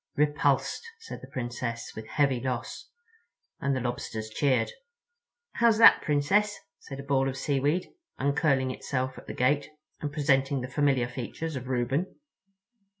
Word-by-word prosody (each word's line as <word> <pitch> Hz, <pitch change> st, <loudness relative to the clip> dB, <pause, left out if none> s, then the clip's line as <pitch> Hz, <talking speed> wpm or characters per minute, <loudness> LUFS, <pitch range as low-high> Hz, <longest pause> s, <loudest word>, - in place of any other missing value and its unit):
"Repulsed," 150 Hz, +1 st, +2 dB, 0.2 s
said 455 Hz, 0 st, -9 dB
the -, -, -10 dB
Princess, 120 Hz, -1 st, -4 dB
"with 110 Hz, 0 st, -7 dB
heavy 140 Hz, -2 st, +2 dB
loss"—and 450 Hz, -, -6 dB
the -, -, 0 dB
Lobsters 120 Hz, -3 st, -4 dB
cheered. 130 Hz, -2 st, +1 dB, 0.8 s
"How's 230 Hz, -2 st, +4 dB
that, 230 Hz, -, +8 dB
Princess?" 195 Hz, +9 st, +2 dB, 0.2 s
said 135 Hz, -2 st, -9 dB
a -, -, -5 dB
ball 135 Hz, -1 st, +2 dB
of 135 Hz, -, -5 dB
seaweed, 145 Hz, +5 st, 0 dB, 0.3 s
uncurling 140 Hz, -1 st, +2 dB
itself 130 Hz, 0 st, -3 dB
at -, -, -16 dB
the -, -, -6 dB
gate 140 Hz, +3 st, +2 dB, 0.3 s
and 150 Hz, -, -3 dB
presenting 135 Hz, -2 st, +2 dB
the 125 Hz, -, -4 dB
familiar 135 Hz, -2 st, +2 dB
features 140 Hz, +6 st, -5 dB
of 130 Hz, -1 st, -5 dB
Reuben. 130 Hz, +7 st, -1 dB
135 Hz, 140 wpm, -28 LUFS, 125-150 Hz, 0.8 s, that